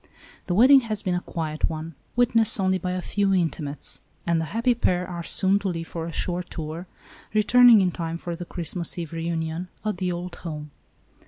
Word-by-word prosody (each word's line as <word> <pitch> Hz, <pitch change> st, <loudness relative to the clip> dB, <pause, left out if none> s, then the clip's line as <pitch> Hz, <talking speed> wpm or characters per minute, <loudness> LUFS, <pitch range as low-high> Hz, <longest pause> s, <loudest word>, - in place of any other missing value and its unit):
The 175 Hz, -, 0 dB
wedding 265 Hz, +6 st, +8 dB
has 215 Hz, -4 st, -4 dB
been 185 Hz, -, 0 dB
a 180 Hz, -, 0 dB
quiet 155 Hz, -3 st, -2 dB
one, 160 Hz, +1 st, -5 dB, 0.2 s
witnessed 230 Hz, -3 st, +3 dB
only 190 Hz, -1 st, +2 dB
by 180 Hz, -1 st, -2 dB
a 185 Hz, -1 st, -3 dB
few 205 Hz, -1 st, 0 dB
inti 180 Hz, -6 st, +1 dB
mates, 145 Hz, -1 st, -5 dB, 0.2 s
and 170 Hz, -1 st, +2 dB
the -, -, -2 dB
happy 230 Hz, -, +1 dB
pair 180 Hz, -6 st, 0 dB
are 175 Hz, -2 st, -5 dB
soon 190 Hz, +3 st, +2 dB
to 200 Hz, -, -3 dB
leave 165 Hz, -2 st, -4 dB
for 165 Hz, -1 st, -4 dB
a -, -, -5 dB
short 175 Hz, +2 st, -3 dB
tour, 160 Hz, +2 st, -6 dB, 0.5 s
returning 235 Hz, +1 st, +7 dB
in 185 Hz, -1 st, +2 dB
time 165 Hz, -1 st, -4 dB
for 170 Hz, 0 st, -5 dB
the 175 Hz, -, -6 dB
Christmas 170 Hz, +1 st, -3 dB
Eve 170 Hz, -2 st, -5 dB
reunion 165 Hz, +1 st, -3 dB, 0.2 s
at 210 Hz, -3 st, -1 dB
the 180 Hz, 0 st, -1 dB
old 175 Hz, 0 st, -5 dB
home. 150 Hz, -3 st, -7 dB
175 Hz, 200 wpm, -25 LUFS, 165-195 Hz, 0.5 s, wedding